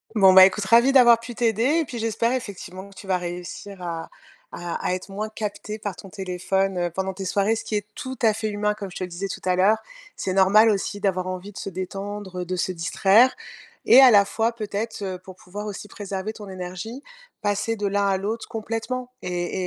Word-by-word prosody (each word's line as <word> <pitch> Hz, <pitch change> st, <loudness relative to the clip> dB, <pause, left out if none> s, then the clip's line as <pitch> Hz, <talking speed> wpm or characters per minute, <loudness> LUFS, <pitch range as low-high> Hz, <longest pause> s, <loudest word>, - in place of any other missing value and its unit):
Bon, 190 Hz, -3 st, +7 dB
ben, 190 Hz, -, +10 dB
écoute, 195 Hz, +2 st, +5 dB
ravie 235 Hz, +6 st, +5 dB
d'avoir 240 Hz, -4 st, +7 dB
pu 235 Hz, +1 st, -8 dB
t'aider 225 Hz, -1 st, +1 dB, 0.2 s
et 325 Hz, -, 0 dB
puis, 245 Hz, -, -7 dB
j'espère, 230 Hz, +1 st, 0 dB
effectivement, 200 Hz, -5 st, -6 dB
que -, -, -16 dB
tu 195 Hz, -, -11 dB
vas 185 Hz, -1 st, +2 dB
réussir 180 Hz, +2 st, -7 dB
à 165 Hz, -2 st, -5 dB, 0.4 s
à 175 Hz, -1 st, -5 dB
à -, -, +1 dB
être 185 Hz, +1 st, -5 dB
moins 205 Hz, +2 st, -4 dB
capté 215 Hz, 0 st, -5 dB
par 205 Hz, -3 st, -4 dB
ton 195 Hz, -, -11 dB
téléphone, 190 Hz, +1 st, -1 dB
heu, 175 Hz, 0 st, 0 dB
pendant 190 Hz, +2 st, -3 dB
tes 190 Hz, +1 st, -6 dB
soirées, 200 Hz, +3 st, +1 dB
ce 225 Hz, -, -5 dB
qui 215 Hz, -, -3 dB
est 205 Hz, -1 st, -1 dB
tout 260 Hz, -3 st, -6 dB
à 220 Hz, -2 st, +4 dB
fait 220 Hz, 0 st, -3 dB
humain, 210 Hz, 0 st, 0 dB
comme 200 Hz, -2 st, -7 dB
je -, -, -8 dB
te -, -, -3 dB
le -, -, -9 dB
disais 185 Hz, +3 st, -5 dB
tout -, -, -5 dB
à 185 Hz, -1 st, +2 dB
l'heure. 195 Hz, +4 st, +4 dB, 0.4 s
C'est 185 Hz, -, -2 dB
normal 200 Hz, +4 st, +6 dB
aussi 205 Hz, 0 st, -1 dB
d'avoir 185 Hz, -2 st, 0 dB
envie 185 Hz, +2 st, -6 dB
de -, -, -12 dB
se -, -, -5 dB
détendre, 190 Hz, 0 st, -5 dB
de 185 Hz, +1 st, -3 dB
se 185 Hz, +1 st, -1 dB
distraire 195 Hz, +8 st, +4 dB, 0.5 s
et 255 Hz, -, +9 dB
à 260 Hz, -2 st, +9 dB
la 200 Hz, -2 st, +6 dB
fois, 225 Hz, +3 st, 0 dB
peut-être, 220 Hz, -1 st, -4 dB
heu, 190 Hz, -2 st, -3 dB
pour 185 Hz, 0 st, -13 dB
pouvoir 200 Hz, +4 st, -8 dB
aussi 210 Hz, 0 st, -6 dB
préserver 200 Hz, +1 st, -5 dB
ton 210 Hz, -2 st, -10 dB
énergie, 185 Hz, +7 st, -6 dB, 0.4 s
passer 205 Hz, +2 st, -1 dB
de 205 Hz, -1 st, -1 dB
l'un 200 Hz, 0 st, +1 dB
à 195 Hz, -1 st, +2 dB
l'autre 215 Hz, +4 st, -4 dB
complètement 230 Hz, +3 st, -4 dB
et 180 Hz, +1 st, -3 dB
200 Hz, 225 wpm, -24 LUFS, 185-220 Hz, 0.5 s, ben